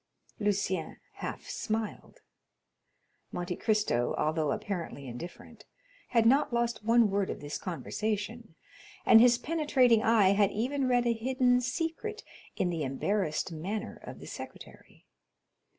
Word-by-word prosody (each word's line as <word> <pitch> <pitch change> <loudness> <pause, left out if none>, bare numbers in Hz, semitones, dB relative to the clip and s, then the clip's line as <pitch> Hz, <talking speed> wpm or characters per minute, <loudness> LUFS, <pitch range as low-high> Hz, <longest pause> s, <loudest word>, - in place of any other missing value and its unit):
'" - - -34
Lucien 190 -4 -1 0.2
half - - -6
smiled. 220 -1 -4 1.1
Monte 175 0 -3
Cristo, 210 - +1
although 155 0 +1
apparently 185 - -4
indifferent, 125 +9 -9 0.4
had 230 -2 +3
not 270 +5 +4
lost 235 -2 -1
one 230 -1 +4
word 200 -1 0
of - - -4
this 145 0 -5
conversation, 210 - -4 0.5
and 225 - +8
his 240 0 +6
penetrating 260 -6 +3
eye 220 -4 +5
had 200 0 +4
even 255 +6 -1
read 245 -1 +3
a 235 - +3
hidden 250 +1 +2
secret 330 - -3 0.3
in 180 -2 0
the 165 -2 -3
embarrassed 155 +5 -1
manner 190 +7 -4
of - - -9
the - - -10
secretary. - - -11
215 Hz, 130 wpm, -30 LUFS, 180-245 Hz, 1.1 s, and